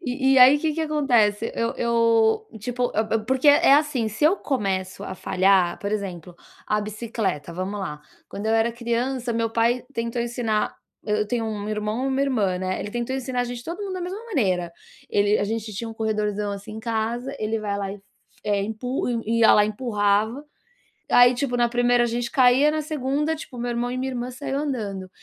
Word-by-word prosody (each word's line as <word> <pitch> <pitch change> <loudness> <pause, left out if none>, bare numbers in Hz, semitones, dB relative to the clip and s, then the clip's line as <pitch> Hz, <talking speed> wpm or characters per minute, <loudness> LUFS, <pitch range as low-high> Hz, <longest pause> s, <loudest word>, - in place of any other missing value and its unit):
E 265 +1 +1
e, - - +6
aí, 265 +3 +8
que 315 0 0
que 325 - -2
acontece? 245 -9 +2
Eu 230 0 -1
eu, 230 - +2
tipo, 245 +2 -2
a - - +2
a 225 +1 0
porque, 265 +4 +2
é 285 -1 +6
assim, 290 -6 +1
se 215 +8 -2
eu 345 +6 +5
começo 195 - -2
a 190 - -5
falhar 185 -2 +2
por 200 - -3
exemplo, 180 -5 -5 0.3
a 210 0 +1
bicicleta, 210 -6 -3
vamos 190 +3 -4
lá, 150 -5 -5 0.3
quando 205 +2 -6
eu 220 - +2
era 225 +1 +2
criança 235 +1 -2
meu 230 0 0
pai 235 +2 +1
tentou 230 0 -2
ensinar 235 -3 -1 0.3
eu 210 0 0
tenho 230 +1 -1
1 210 -1 -4
irmão 215 +3 -2
e 270 - 0
1, 265 0 0
irmã, 215 -10 +1
né, 185 0 -2
ele 205 - -5
tentou 240 +2 -2
ensinar 255 -1 -2
a 245 - +1
gente 240 0 -6
todo 340 +5 -6
mundo 390 -2 -4
da 365 - -4
mesma 360 +3 -4
maneira. 190 - 0 0.4
Ele 205 +1 +2
a - - 0
gente 220 0 -3
tinha 225 +4 -5
um 225 - -8
corredorzão, 210 -2 -1
assim, 200 +1 -8
em 220 - -6
casa 235 +4 -2
ele 220 +1 -1
vai 205 -1 -2
lá 195 -1 -3
e 205 - -10 0.4
empu 215 +6 -1
i 230 -1 -1
ia, 225 - +7
lá, 210 - +5
e - - -1
empurrava. 215 +3 0 0.7
Aí, 245 0 +7
tipo, 245 0 -1
na 240 0 +3
1ª 245 0 +3
a - - +2
gente 235 0 -2
caía, 260 +3 +5
na 310 0 -1
2ª, 300 +1 -1
tipo, 295 -4 -10
meu 240 0 -2
irmão 240 +1 -2
e 255 - -3
minha 265 +1 -2
irmã 245 0 -4
saiu 270 +1 -4
andando. 210 -10 -4
230 Hz, 205 wpm, -24 LUFS, 210-255 Hz, 0.7 s, aí